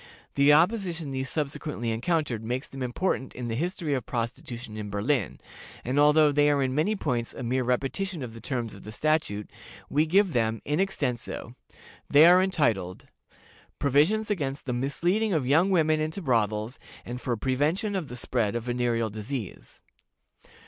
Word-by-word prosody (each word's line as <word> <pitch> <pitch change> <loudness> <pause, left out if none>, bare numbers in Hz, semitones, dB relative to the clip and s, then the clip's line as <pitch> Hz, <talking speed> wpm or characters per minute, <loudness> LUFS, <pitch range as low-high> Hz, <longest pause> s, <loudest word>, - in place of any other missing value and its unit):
The 140 +1 +5
opposition 170 -2 +2
these 130 0 -3
subsequently 145 -5 -3
encountered 120 -1 -1
makes 125 +4 -3
them 135 - -9
important 130 +2 -2
in 120 -1 -4
the - - -2
history 165 - -2
of 130 -3 -1
Prostitution 115 -1 -5
in 105 -1 -5
Berlin, 105 - -1 0.5
and 130 +4 +1
although 150 +1 +6
they 145 +1 +4
are 140 -2 +2
in 130 -1 -1
many 160 +10 +1
points 125 - -2
a - - -6
mere 130 +2 0
repetition 140 +7 -1
of 115 -3 -7
the 115 - -10
terms 120 -2 -3
of - - -12
the 105 - -8
statute, 110 -6 -1 0.4
we 150 +3 +2
give 190 +1 +3
them 115 -2 +1
in 150 +3 0
extenso. 140 -11 -2 0.6
They 145 +3 +8
are 180 +2 +7
entitled, 120 - 0 0.7
"PROVISIONS 160 +11 +2
AGAINST 140 -7 -2
THE 125 - -2
MISLEADING 175 - 0
OF 150 -6 +1
YOUNG 160 +9 +4
WOMEN 155 -4 +3
INTO 160 +5 -3
BROTHELS, 110 -2 0 0.3
AND 125 +1 -6
FOR 120 -2 -1
PREVENTION 150 - 0
OF 180 -6 -2
THE 125 - -8
SPREAD 115 -3 -1
OF 120 - -2
VENEREAL 120 -2 0
DISEASE. 110 +1 -7
135 Hz, 165 wpm, -27 LUFS, 120-160 Hz, 0.7 s, They